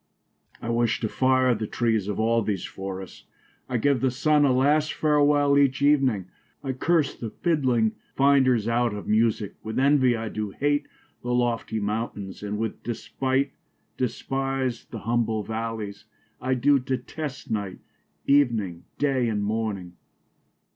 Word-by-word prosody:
I 115 - -2
wish 115 -2 +1
to 110 - 0
fire 130 +2 +3
the 110 -1 -3
trees 110 -4 0
of 105 0 -3
all 115 +1 +2
these 100 -3 -2
forrests; 95 -1 -7 0.4
I 125 - 0
give 135 +1 +2
the 130 - +3
Sunne 145 +4 +2
a 135 - +4
last 145 +4 +2
farewell 145 -1 +3
each 140 0 +2
evening; 135 -9 +3 0.4
I 135 - -1
curse 155 +2 +1
the 115 - -5
fidling 125 -8 +1 0.2
finders 130 -5 +4
out 115 -2 +1
of 105 - -6
Musicke: 110 -2 +1
With 110 0 -5
envie 130 -2 +4
I 110 -1 -4
doo 105 -1 -3
hate 145 +1 +1 0.3
the 125 - -5
loftie 120 -2 0
mountaines; 105 -2 -4
And 105 0 -3
with 110 0 -3
despite 130 +3 -1 0.4
despise 135 0 -2
the 115 - -8
humble 115 -2 0
val/ies: 110 -2 -5 0.4
I 130 +1 +1
doo 140 +3 +4
detest 130 +2 -5
night, 100 -4 -2 0.5
evening, 115 -11 +2
day, 135 -4 +1
and 105 -2 -1
morning. 100 -4 -3
120 Hz, 145 wpm, -25 LUFS, 110-135 Hz, 0.5 s, a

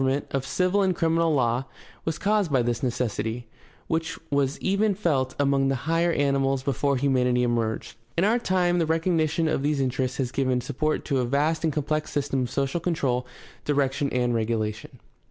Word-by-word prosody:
The - - +2
evolution 135 +1 +2
of 145 - -6
government, 135 -1 -1
of - - -8
civil 185 +6 +2
and 190 -2 +2
criminal 165 0 +2
law, 120 0 +1 0.4
was 160 -1 -1
caused 205 -4 +1
by 130 -3 +3
this 120 +2 -1
necessity, 120 -2 -2 0.4
which 165 +1 -2
was 140 0 +1
even 200 +1 +1
felt 140 -9 0
among 140 -1 +2
the 135 - +1
higher 165 +2 +2
animals 135 -2 +1
before 140 0 0
humanity 125 -2 +2
emerged. 115 -3 -1 0.2
In 170 - +3
our 210 +3 +4
own 240 - +2
time 180 -5 +1
the 165 - +1
recognition 165 -1 +1
of 155 - 0
these 145 0 0
interests 130 -1 -1
has 125 -3 -1
given 130 -2 +1
support 155 +5 -2
to 140 -3 0
a 125 - +1
vast 150 +6 +1
and 160 - +2
complex 150 +1 -1
system 140 -2 -1
of 125 - -2
social 135 +5 -1
control, 135 -8 -1 0.4
direc 140 -2 +1
tion, 140 +1 -1
and 125 -1 0
regulation. 110 -2 -2
140 Hz, 195 wpm, -25 LUFS, 125-165 Hz, 0.4 s, our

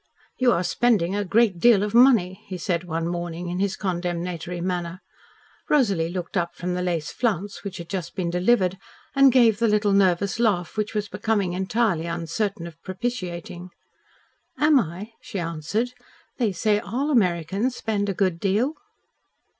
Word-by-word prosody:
"You 255 -2 +4
are 180 - +1
spending 200 -3 +1
a 205 - 0
great 200 -1 +2
deal 215 -1 +5
of 210 - -3
money," 230 -7 +5
he 185 - -5
said 175 0 -2
one 165 -1 -2
morning 175 0 -4
in 180 +1 -3
his 200 0 0
condemnatory 175 -1 -3
manner. 175 0 -3 0.7
Rosalie 200 - +2
looked 175 0 -5
up 175 -1 -1
from 180 0 -3
the 180 - -2
lace 170 -4 -2
flounce 205 -4 -2
which 195 -2 -6
had 170 - -8
just 180 -4 -5
been 175 -3 -2
delivered 185 0 +2 0.3
and 275 -1 +6
gave 230 -4 +4
the 230 - +3
little 210 -1 +2
nervous 195 +1 +2
laugh, 200 -8 +1
which 215 0 -2
was 210 -1 -1
becoming 200 -4 -1
entirely 190 -2 0
uncertain 170 +2 -2
of 165 -1 -11
propitiating. 180 -4 -5 0.9
"Am 300 -2 +5
I?" 185 +3 -5
she - - -7
answered. 170 +8 -2 0.5
"They 230 -4 +2
say 205 +3 +1
all 255 +7 -2
Americans 195 - +1
spend 205 -2 -1
a 195 - -2
good 185 -3 0
deal." 210 - +1
190 Hz, 160 wpm, -24 LUFS, 175-220 Hz, 0.9 s, and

